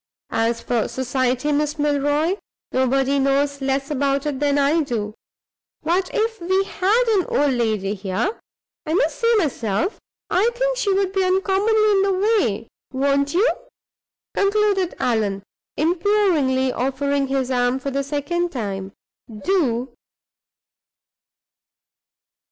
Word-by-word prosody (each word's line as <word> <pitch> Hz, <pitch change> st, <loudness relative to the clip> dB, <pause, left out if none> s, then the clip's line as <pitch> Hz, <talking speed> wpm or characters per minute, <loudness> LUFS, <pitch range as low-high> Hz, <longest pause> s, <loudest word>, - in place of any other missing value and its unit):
As 230 Hz, +1 st, 0 dB
for 235 Hz, -3 st, 0 dB
society, 260 Hz, +2 st, -1 dB
Miss 300 Hz, +1 st, 0 dB
Milroy, 295 Hz, +4 st, +1 dB, 0.4 s
nobody 270 Hz, +2 st, +1 dB
knows 280 Hz, +1 st, +1 dB
less 275 Hz, +1 st, -1 dB
about 280 Hz, 0 st, 0 dB
it 290 Hz, -3 st, -2 dB
than 290 Hz, -1 st, +1 dB
I 285 Hz, +4 st, +3 dB
do; 220 Hz, -7 st, -3 dB, 0.7 s
but 360 Hz, +3 st, +1 dB
if 450 Hz, -2 st, -1 dB
we 375 Hz, +3 st, +1 dB
had 400 Hz, +5 st, +1 dB
an 400 Hz, -5 st, +2 dB
old 285 Hz, -1 st, +2 dB
lady 215 Hz, -5 st, 0 dB
here, 200 Hz, -, -2 dB, 0.5 s
I 315 Hz, -, 0 dB
must -, -, +1 dB
say 465 Hz, 0 st, +3 dB
myself 300 Hz, -, -1 dB, 0.3 s
I 415 Hz, +6 st, +2 dB
think -, -, 0 dB
she 425 Hz, -5 st, +1 dB
would 385 Hz, -1 st, +1 dB
be 385 Hz, -1 st, +2 dB
uncommonly 395 Hz, +3 st, +2 dB
in 390 Hz, -1 st, +3 dB
the 390 Hz, 0 st, +2 dB
way. 370 Hz, -, +1 dB, 0.2 s
Won't 280 Hz, +2 st, +1 dB
you?" 410 Hz, +7 st, +4 dB, 0.9 s
concluded 400 Hz, -2 st, +1 dB
Allan, 210 Hz, -5 st, 0 dB, 0.3 s
imploringly 325 Hz, -6 st, +2 dB
offering 275 Hz, +2 st, -1 dB
his 265 Hz, -1 st, -1 dB
arm 245 Hz, 0 st, +1 dB
for 275 Hz, +1 st, -4 dB
the 275 Hz, +1 st, 0 dB
second 295 Hz, +5 st, -2 dB
time. 195 Hz, -, -4 dB, 0.4 s
"Do!" 250 Hz, -, -1 dB
285 Hz, 125 wpm, -21 LUFS, 260-380 Hz, 0.9 s, you